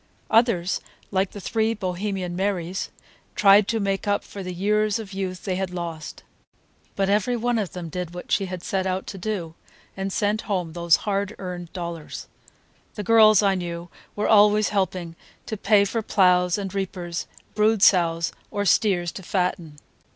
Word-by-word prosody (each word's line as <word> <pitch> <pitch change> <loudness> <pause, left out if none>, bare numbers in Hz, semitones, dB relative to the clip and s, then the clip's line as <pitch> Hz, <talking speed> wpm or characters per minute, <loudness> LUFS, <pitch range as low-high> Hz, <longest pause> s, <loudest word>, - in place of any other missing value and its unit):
Others, 220 -6 +2 0.3
like 190 -1 +1
the 205 - -9
three 220 +3 0
Bohemian 185 -2 -3
Marys, 185 -1 -2 0.5
tried 200 0 +6
to 225 - 0
make 195 0 -1
up 205 0 +1
for 200 - -9
the 185 -1 -5
years 210 +3 +1
of 210 -3 -8
youth 190 -1 -4
they 185 -2 -1
had 190 -1 -2
lost. 170 -3 -6 0.7
But 195 -1 +1
every 210 +5 +1
one 240 0 0
of 200 -4 -3
them 180 -2 -6
did 180 +1 -5
what 180 - -8
she 195 -1 +2
had 180 -1 -6
set 195 -5 -1
out 185 0 -2
to 195 - -7
do, 180 -5 -3 0.4
and 195 0 -3
sent 210 +1 0
home 180 -5 -1
those 170 -1 +4
hard 200 -1 -1
earned 180 -2 -6
dollars. 170 -3 -6 0.7
The 210 - -4
girls 215 -1 +6
I 200 -1 +4
knew 175 -1 -5 0.3
were 210 - 0
always 210 0 +5
helping 185 -4 -2 0.3
to 220 - -4
pay 200 0 +4
for 225 +3 -2
ploughs 180 -3 +3
and 195 -2 -4
reapers, 180 -3 -4 0.3
brood 215 -1 +2
sows, 170 -3 +4 0.2
or 205 0 -2
steers 180 -4 +2
to 190 - -8
fatten. 180 -4 -2
195 Hz, 170 wpm, -24 LUFS, 180-210 Hz, 0.7 s, tried